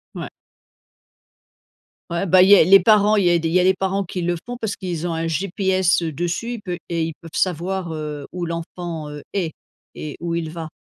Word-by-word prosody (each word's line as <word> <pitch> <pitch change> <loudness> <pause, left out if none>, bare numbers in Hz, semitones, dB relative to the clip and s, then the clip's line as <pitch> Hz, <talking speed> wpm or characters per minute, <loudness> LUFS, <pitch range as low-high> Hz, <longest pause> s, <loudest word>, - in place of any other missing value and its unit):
Ouais. - - -5 1.8
Ouais, 170 +3 -1
bah, 185 0 +6
il 185 - +6
y 205 - +10
a - - +7
les 195 +4 +8
parents, 210 +2 +4
il 195 - +2
y - - +5
a 175 - +4
des 165 0 -1
il - - -3
y 185 - +5
a - - +3
les 190 +1 +4
parents 195 +1 -1
qui 180 -1 -5
le 175 0 0
font 245 0 -5
parce 220 -4 -3
qu'ils 175 -3 -4
ont 170 - -1
un 165 0 -2
GPS, 185 +2 +1
heu, 165 -2 -2
dessus 175 - -3
ils 235 - -5
pe 180 -4 -5
et 170 -1 0
ils 160 0 -3
peuvent 165 +2 -13
savoir, 180 0 -1
heu, 150 -2 -5
où 175 -2 -4
l'enfant, 165 -2 -5
heu, 145 -1 -8
est, 175 -6 -1 0.4
et 150 -2 -7
où 170 0 -3
il 165 -2 -2
va. 160 -1 -6
175 Hz, 235 wpm, -21 LUFS, 165-190 Hz, 1.8 s, y